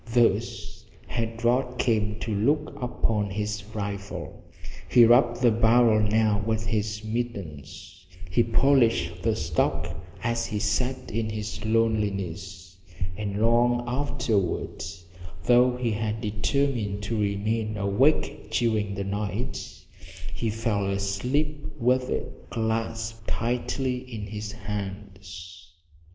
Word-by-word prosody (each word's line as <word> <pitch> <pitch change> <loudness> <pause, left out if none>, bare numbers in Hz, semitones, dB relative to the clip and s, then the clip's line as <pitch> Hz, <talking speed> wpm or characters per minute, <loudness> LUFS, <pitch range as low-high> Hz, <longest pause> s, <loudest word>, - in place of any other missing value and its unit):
Thus 120 0 +1 0.2
had 115 0 -3
Rod 125 +1 +2
come 105 -4 +1
to 110 - -2
look 145 +9 +1
upon 110 -4 0
his 105 +1 -3
rifle. 100 -1 -5 0.5
He 120 -2 +8
rubbed 120 +1 +4
the 120 - +6
barrel 115 0 +5
now 105 0 +3
with 110 0 -1
his 110 -1 -1
mittens; 95 - -5 0.2
he 90 +7 +3
polished 115 -7 +3
the 110 +1 +1
stock 80 -4 0 0.3
as 115 -1 0
he 105 - -3
sat 125 +5 -1
in 110 0 -1
his 110 0 -4
loneliness, 100 -5 -1 0.4
and 100 0 -3
long 120 +2 +3
afterward, 115 -7 -1 0.6
though 125 0 +5
he 120 -2 0
had 110 +1 -1
determined 105 -1 0
to 110 +1 -1
remain 105 +2 0
awake 100 +10 +2
during 110 -4 +1
the 100 - -2
night, 100 0 -4 0.5
he 115 - -1
fell 105 -2 0
asleep 125 +10 -1
with 125 +2 +2
it - - -4
clasped 115 0 -2
tightly 125 +2 -1
in 120 -5 -7
his 105 +1 -5
hands. 95 -3 -7
110 Hz, 115 wpm, -26 LUFS, 100-120 Hz, 0.6 s, He